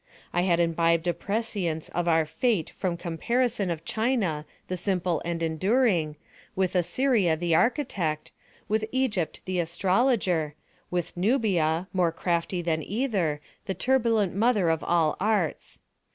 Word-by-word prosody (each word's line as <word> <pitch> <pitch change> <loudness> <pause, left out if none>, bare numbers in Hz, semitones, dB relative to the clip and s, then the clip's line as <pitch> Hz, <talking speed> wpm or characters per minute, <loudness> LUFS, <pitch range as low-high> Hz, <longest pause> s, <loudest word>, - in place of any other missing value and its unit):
I 175 - +2
had 175 -2 +2
imbibed 165 0 +2
a 175 - +2
prescience 200 -7 -2
of 175 0 -2
our 160 -1 +3
Fate 210 - 0
from 180 -3 -2
comparison 210 +5 -1
of 165 -1 -4
China 215 - 0 0.2
the 185 - -2
simple 180 -2 0
and 170 -1 -2
enduring, 170 - +1 0.4
with 190 -1 0
Assyria 185 0 +2
the 170 0 0
architect, 180 - 0 0.4
with 215 +1 +1
Egypt 230 -10 -1
the 185 -1 -1
astrologer, 180 - +1 0.3
with 175 -2 -3
Nubia, 180 - +1
more 180 -3 +2
crafty 175 +1 -1
than 160 -2 0
either, 195 - -1 0.3
the 190 - -2
turbulent 230 -7 +2
mother 210 -3 +2
of 160 - -1
all 165 -3 +2
Arts. 200 -5 -1
180 Hz, 135 wpm, -27 LUFS, 165-220 Hz, 0.4 s, our